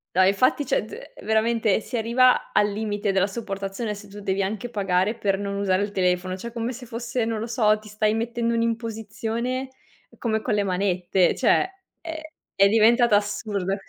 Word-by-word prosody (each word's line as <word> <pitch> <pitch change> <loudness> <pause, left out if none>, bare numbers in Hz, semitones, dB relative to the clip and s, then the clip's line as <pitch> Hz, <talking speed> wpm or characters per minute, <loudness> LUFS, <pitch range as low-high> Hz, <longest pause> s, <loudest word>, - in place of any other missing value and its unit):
No, 185 - +6
infatti, 200 +9 +3
cioè, 250 - +1
de - - -10
veramente 220 0 +2
si 240 - -4
arriva 245 +3 +3
al 205 - +3
limite 205 -1 -2
della 190 0 +2
sopportazione 200 0 -4
se 205 0 -11
tu 205 +1 -10
devi 195 0 -1
anche 215 +5 -3
pagare 195 -1 +1
per 195 -3 0
non 200 0 -4
usare 195 -1 +1
il 205 - -4
telefono, 185 -1 0
cioè 235 +4 -7
come 235 +1 -2
se 250 0 -9
fosse, 235 0 -3
non 225 -1 -2
lo 225 - -4
so, 215 -2 +3
ti 215 0 -14
stai 215 0 +1
mettendo 235 +1 -1
un'imposizione 230 +2 -2 0.5
come 220 -2 0
con 220 - -1
le 205 -1 +2
manette, 185 -1 +1
cioè, 375 - +3 0.3
eh, 315 -1 -7 0.2
è 195 0 +5
diventata 225 +1 +5
assurdo. 205 -2 -2
215 Hz, 175 wpm, -24 LUFS, 200-235 Hz, 0.5 s, No